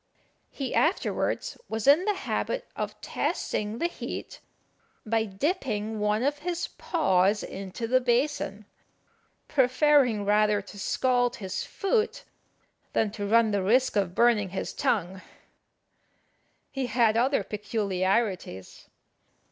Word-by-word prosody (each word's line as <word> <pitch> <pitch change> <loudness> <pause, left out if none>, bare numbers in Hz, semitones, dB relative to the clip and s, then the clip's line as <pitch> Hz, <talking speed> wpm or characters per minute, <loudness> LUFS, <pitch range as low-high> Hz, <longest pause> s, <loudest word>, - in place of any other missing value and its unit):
He 270 -3 -5
afterwards 390 +8 0
was 220 -1 -3
in 295 +7 +6
the 420 -1 +1
habit - - -3
of - - -4
testing 210 +1 -2
the 335 - -1
heat 345 - -5 0.7
by 225 0 +1
dipping 220 - -2
one 210 +2 +1
of 290 +2 0
his 345 +1 -3
paws 200 - +1
into 195 +4 -6
the 255 +2 +3
basin, 245 -4 0 0.8
preferring 260 -5 +3
rather 210 0 +3
to 205 +1 -11
scald 245 +3 +1
his 190 -4 -4
foot 430 +3 -1 0.7
than 215 -2 +1
to 205 -1 -4
run 225 +1 +4
the 200 -1 +1
risk 245 +7 +2
of 190 -4 0
burning 230 -5 +3
his 190 - -4
tongue. 185 -1 -1 1.5
He 270 -2 -2
had 225 -1 +3
other 255 +4 +2
peculiarities. 195 - -2
225 Hz, 115 wpm, -27 LUFS, 205-270 Hz, 1.5 s, in